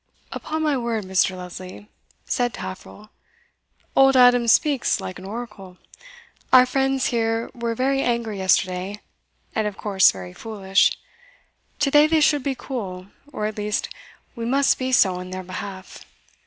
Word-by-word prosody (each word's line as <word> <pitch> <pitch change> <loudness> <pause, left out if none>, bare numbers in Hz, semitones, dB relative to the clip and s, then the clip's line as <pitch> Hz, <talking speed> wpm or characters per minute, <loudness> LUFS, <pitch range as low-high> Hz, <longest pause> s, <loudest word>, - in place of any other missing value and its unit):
"Upon 315 0 -4
my 300 -2 +1
word, 230 -4 -2
Mr. 185 0 +1
Lesley," 180 +2 -9 0.4
said 245 -2 -1
Taffril, 185 +3 -9 0.8
"old 270 0 +5
Adam 245 -1 +5
speaks 275 +3 +2
like 185 - -7
an 185 - -11
oracle. 205 -4 -8 0.7
Our 255 0 +8
friends 270 0 0
here 225 0 -1
were 235 -1 -3
very 270 +3 +1
angry 235 -5 -2
yesterday, 190 +1 0 0.5
and 220 -1 0
of 205 - -6
course 195 -3 +4
very 90 -1 -9
foolish; 195 - +1 0.8
today 295 +1 +4
they 320 0 +2
should 295 -1 +3
be 275 0 -2
cool, 195 -8 -6 0.2
or 210 - -3
at 215 0 -4
least 210 0 -2 0.5
we 235 - -6
must 270 +4 +2
be 260 0 -2
so 190 -7 +3
in 180 0 -8
their 185 0 -6
behalf. 190 +1 -8
225 Hz, 145 wpm, -22 LUFS, 190-255 Hz, 0.8 s, Our